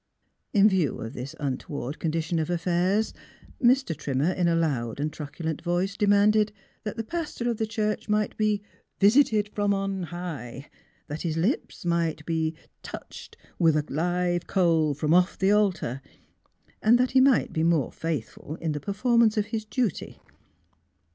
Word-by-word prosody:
In 205 0 +6
view 185 -8 +1
of 115 +3 -6
this 135 +5 -7
untoward 140 0 -4
condition 165 +1 -1
of 155 - -2
affairs, 180 +4 +1 0.5
Mr. 250 -7 +3
Trimmer, 145 +2 0
in 180 -1 0
a 170 - +3
loud 135 -8 -1
and 150 +1 -2
truculent 160 +1 -5
voice, 180 +3 -1
demanded 210 +1 +4 0.3
that' 215 +1 -5
the 225 - -2
pastor 305 -3 -4
of 230 - -3
the 220 - -1
church 215 -1 -2
might 210 -1 +1
be 210 -1 0 0.2
" - - -44
visited 215 -5 +3
from 205 -1 0
on 195 -1 -2
high;" 155 -7 -6 0.3
that 150 +2 -6
his 165 -2 -2
lips 185 - -1
might 165 -3 0
be 160 -1 -1
" - - -49
touched - - -10 0.2
with 160 -2 +4
a 150 - 0
live 175 +3 0
coal 165 -6 +2
from 150 +2 +1
off 180 +1 +3
the 190 +1 +3
altar, 185 - +1 0.3
' - - -41
' - - -36
and 230 +3 +5
that 250 +1 +1
he 260 - +5
might 265 -2 +3
be 160 - 0
more 165 -5 +2
faithful 155 -1 -4
in 160 - -2
the 150 - -3
performance 225 - +2
of 210 - +2
his 220 -1 -2
duty. 225 - -2
175 Hz, 170 wpm, -26 LUFS, 155-210 Hz, 0.5 s, In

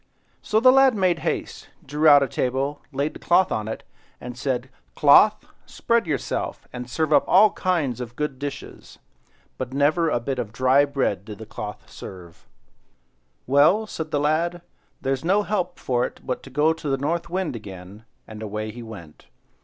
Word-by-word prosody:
So 215 - +1
the 255 +3 +7
lad 270 -2 +5
made 185 -4 +1
haste, 160 - -4 0.2
drew 150 +3 +1
out 145 -2 +8
a - - -1
table, 135 +4 -2
laid 140 +2 -2
the - - -11
cloth 185 +2 +3
on 110 -1 -2
it, 110 - -5 0.4
and 125 0 -8
said— 130 0 -3 0.2
"Cloth, 155 +8 +5 0.2
spread 235 -5 0
yourself, 150 -4 -3
and 125 -1 -7
serve 155 +3 0
up - - +5
all 205 +2 +6
kinds 155 - -1
of 120 -1 -7
good 150 -2 -3
dishes." 145 0 -8 0.6
But 130 - -5
never 155 +4 +2
a 120 - 0
bit 130 +2 -3
of 110 -4 -4
dry 130 +5 +3
bread 135 -9 -1
did 105 0 -9
the 110 - -9
cloth 105 -1 -8
serve 85 -3 -12 1.0
"Well," 145 - +4
said 160 -6 -6
the 145 - 0
lad, 165 +4 0 0.4
"there's 135 +1 -1
no 195 +5 +2
help 200 -3 -2
for 125 -1 0
it - - -15
but 125 - -3
to - - -12
go 150 +4 +2
to 160 -2 -6
the 135 - +1
North 165 +5 -2
Wind 185 -5 -2
again;" 100 -1 -10 0.2
and 110 0 -10
away 110 0 -4
he 120 +2 -10
went. 100 -10 -12
140 Hz, 180 wpm, -23 LUFS, 120-165 Hz, 1.0 s, out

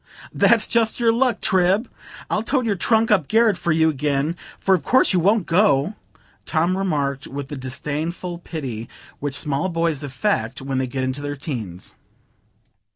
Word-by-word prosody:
"That's 230 -2 +4
just 230 -1 +1
your 230 -1 +3
luck, 240 -2 +1
Trib. 190 +4 +3 0.4
I'll 210 - 0
tote 250 +2 0
your 220 - +1
trunk 225 +4 +2
up 185 -9 +3
garret 225 -2 +4
for 170 -1 -1
you 160 0 +3
again; 145 +2 -1 0.2
for 195 - +2
of 175 -6 +1
course 260 - +3
you 180 - +3
won't 200 +2 +2
go," 170 -2 +3 0.5
Tom 170 +3 +1
remarked, 145 -8 -1
with 140 0 -6
the 145 - -5
disdainful 150 +6 -4
pity 130 -10 -6 0.3
which 145 -1 -3
small 145 +5 -1
boys 165 -4 -1
affect 130 -3 -1
when 135 0 -2
they 130 - -1
get 130 +1 -3
into 130 +2 -3
their 145 0 -4
teens. 115 - -6
160 Hz, 165 wpm, -22 LUFS, 140-200 Hz, 0.5 s, That's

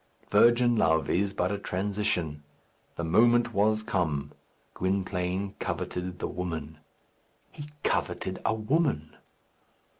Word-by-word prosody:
Virgin 120 0 +5
love 80 -7 +2
is 100 +3 +1
but 90 -1 -1
a 100 - -2
transition. 95 -6 -2 0.5
The 85 - -4
moment 120 +7 +4
was 110 +2 +2
come. 85 -10 -1 0.4
Gwynplaine 95 0 -1
coveted 90 0 -3
the - - -3
woman. 80 -4 -5 0.7
He 145 - -9 0.2
coveted 95 - -1
a - - +2
woman! 110 - 0
95 Hz, 110 wpm, -28 LUFS, 90-110 Hz, 0.7 s, Virgin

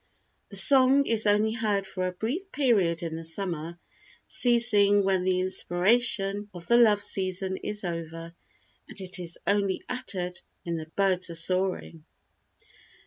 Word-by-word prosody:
The - - -8
song 275 0 +6
is 220 -3 +2
only 210 +1 +2
heard 210 -4 -2
for 185 -1 -4
a - - -3
brief 270 - -5
period 200 - 0
in 165 -1 -5
the 165 - -7
summer, 165 -1 -5 0.5
ceasing 210 -5 +3
when 190 -1 0
the 185 -1 0
inspiration 195 +2 +1
of 175 -1 -10
the 235 - +3
love 210 -4 +3
season 190 0 -2
is 210 0 -5
over, 165 -1 -7 0.5
and - - -6
it 185 -1 -4
is 170 -1 -5
only 200 -2 -1
uttered 185 -8 -3 0.2
when 170 -1 -4
the 155 -1 -8
birds 190 -2 +1
are 170 - -6
soaring." 180 -1 0
195 Hz, 145 wpm, -26 LUFS, 175-215 Hz, 0.5 s, song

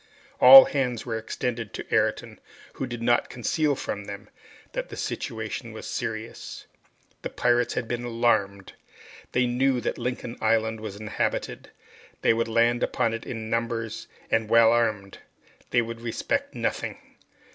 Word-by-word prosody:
All 270 0 +11
hands 125 -5 -2
were 115 -3 -3
extended 115 0 -4
to - - -6
Ayrton, - - 0 0.3
who 135 - -4
did 120 -1 -6
not 120 0 +2
conceal 145 +4 0
from 100 -5 -5
them 100 -1 -9 0.4
that - - -4
their - - -8
situation - - -4
was - - -8
serious. 115 -1 -5 0.6
The - - -4
pirates 120 0 +1
had 120 - -2
been 120 +1 -3
alarmed. 115 -5 0 0.6
They 125 - +3
knew 125 +1 +1
that 120 - -3
Lincoln 120 0 -4
Island 110 0 +1
was 110 -2 -6
inhabited. 105 0 -3 0.5
They - - +5
would 115 +1 0
land 115 +1 +2
upon 115 - 0
it 115 - -6
in 110 -2 -5
numbers 115 -1 -2 0.2
and 110 -1 +1
well 115 0 +6
armed. 110 -4 0 0.5
They 120 -1 +2
would 115 0 -7
respect 280 - -2
nothing. - - -2
115 Hz, 145 wpm, -26 LUFS, 110-120 Hz, 0.6 s, All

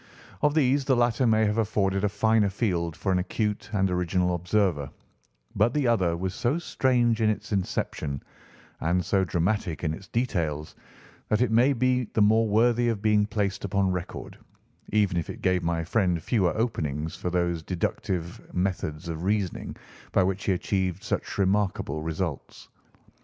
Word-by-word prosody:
Of 150 0 +2
these 140 -2 +3
the 135 - +3
latter 120 +1 +2
may 110 -1 +4
have 105 +2 0
afforded 100 -3 +1
a 105 - +3
finer 105 0 +2
field 90 -6 -1
for 95 - -1
an 90 - +2
acute 105 +3 -2
and 95 -3 +2
original 90 0 +1
observer, 90 -5 0 0.7
but 115 +5 +2
the 145 -3 +1
other 90 -8 +2
was 95 +1 -3
so 120 - 0
strange 120 -8 +1
in 110 - +4
its 110 - -3
inception 75 -7 -2 0.6
and 90 +1 0
so 95 +1 +2
dramatic 85 -1 -1
in 80 -2 0
its 95 +5 -9
details 85 - -2 0.6
that 105 - +2
it 125 -3 +2
may 125 +5 +4
be 125 0 +1
the 110 - +3
more 110 +2 +4
worthy 120 +3 +3
of 105 -3 -2
being 105 -1 +3
placed 100 -2 -2
upon 100 -1 +1
record, 90 -1 -6 0.5
even 105 -4 +2
if 85 - -2
it - - -8
gave 95 -1 +2
my 85 -1 -1
friend 90 -2 0
fewer 95 -7 +1
openings 80 - -2
for 90 - -3
those 85 -2 0
deductive 85 0 -3
methods 90 -3 -2
of 80 -1 -4
reasoning 100 -1 -1 0.4
by - - +4
which 95 +1 -1
he - - +2
achieved 95 0 -1
such - - -3
remarkable 95 -6 0
results. 80 -1 -4
95 Hz, 165 wpm, -26 LUFS, 85-110 Hz, 0.7 s, may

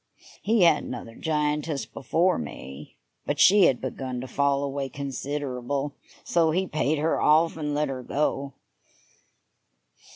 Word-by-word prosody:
He 215 -1 +3
had 165 -3 +5
another 115 - -7
giantess 150 0 -1
before 165 - 0
me, 70 -1 -8 0.3
but - - -1
she 200 0 +7
had 130 - +3
begun 130 -1 -4
to 130 - -6
fall 140 +2 +1
away 140 -1 -3
considerable, 140 0 -3 0.3
so 165 -2 +2
he 185 +4 +1
paid 155 -2 0
her 155 +2 0
off 160 +2 +4
and 150 -2 -3
let 150 0 +1
her 130 -1 -4
go. 140 0 -1
145 Hz, 135 wpm, -26 LUFS, 135-155 Hz, 0.3 s, she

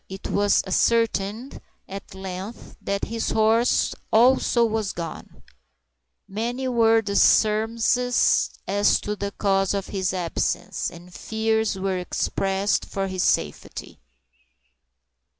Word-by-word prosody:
It 190 0 -7
was 205 0 +2
ascertained, 225 +3 0 0.3
at 195 0 -9
length, 190 +3 -8
that 200 0 -2
his 230 0 -3
horse 225 +2 +2 0.2
also 240 +1 +4
was 220 -3 -2
gone. 165 -2 -8 0.8
Many 240 +6 -3
were 225 -2 +3
the 200 -1 -3
surmises 225 +4 +3 0.2
as 205 +1 +3
to 210 - -3
the 200 -1 -3
cause 195 -1 0
of 195 -1 -4
his 190 -2 -1
absence, 180 -3 -2
and 175 +1 -14
fears 220 -1 -1
were 190 -1 -2
expressed 195 +2 -1
for 195 -1 -3
his 185 -1 -3
safety. - - -2
205 Hz, 115 wpm, -24 LUFS, 195-225 Hz, 0.8 s, also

